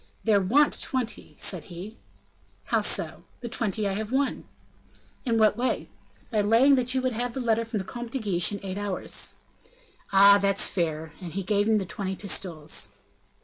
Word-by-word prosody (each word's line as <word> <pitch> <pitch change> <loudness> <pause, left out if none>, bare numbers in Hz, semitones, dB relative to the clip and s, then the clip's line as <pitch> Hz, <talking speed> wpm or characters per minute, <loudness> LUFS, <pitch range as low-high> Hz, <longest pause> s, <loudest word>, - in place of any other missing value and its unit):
"There 210 -3 +4
want 275 +11 +3
twenty," 250 -3 -2
said 180 -6 -2
he. 185 +5 -9 0.7
"How - - +1
so?" - - 0 0.2
"The 240 - -5
twenty 215 -3 -1
I 195 - -1
have 215 +2 -4
won." 275 +1 0 0.8
"In 230 -1 +2
what 215 -1 +4
way?" 250 +3 -1 0.4
"By 215 -2 +2
laying 230 +7 +5
that 255 -1 +2
you 260 - +1
would 255 -1 0
have 240 +1 -3
the - - -2
letter 230 -2 +1
from 225 -1 -4
the 195 - -2
Comte 240 +4 -6
de 270 - -2
Guiche 195 -8 +2
in 200 - -4
eight 190 +1 -4
hours." 205 -2 -2 0.8
"Ah! 200 +1 +7
that's 195 0 +2
fair," 160 -3 -2
and 175 -3 -7
he 195 +1 -2
gave 205 +2 +1
him 220 - +4
the 195 - -1
twenty 190 +2 -4
pistoles. 160 - -2
210 Hz, 185 wpm, -26 LUFS, 190-235 Hz, 0.8 s, Ah